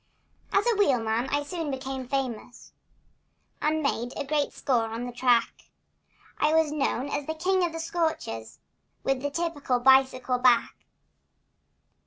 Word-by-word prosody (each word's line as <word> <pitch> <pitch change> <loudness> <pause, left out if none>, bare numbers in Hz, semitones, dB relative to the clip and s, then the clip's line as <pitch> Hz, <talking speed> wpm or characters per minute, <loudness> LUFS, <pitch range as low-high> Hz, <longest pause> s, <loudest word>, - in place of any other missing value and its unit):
As 400 +1 +2
a 475 -2 +3
wheelman 245 - +1
I 290 +1 0
soon 325 +1 -4
became 265 -1 -5
famous 250 -3 -4 0.9
And 310 +1 +1
made 245 -3 -1
a - - -3
great 295 0 0
score 240 -4 0
on 225 +2 -5
the 245 - -5
track— 240 -1 +1 0.7
I 305 +1 +3
was 320 -2 +3
known 275 -3 -1
as 285 0 -3
the 315 - -2
king 370 +3 +1
of 345 - 0
the 330 - -6
scorchers, 320 - -3 0.5
With 270 -1 0
the 285 - -1
typical 290 -5 -1
bicycle 260 -1 +4
back. 245 -2 +4
270 Hz, 145 wpm, -27 LUFS, 245-315 Hz, 0.9 s, bicycle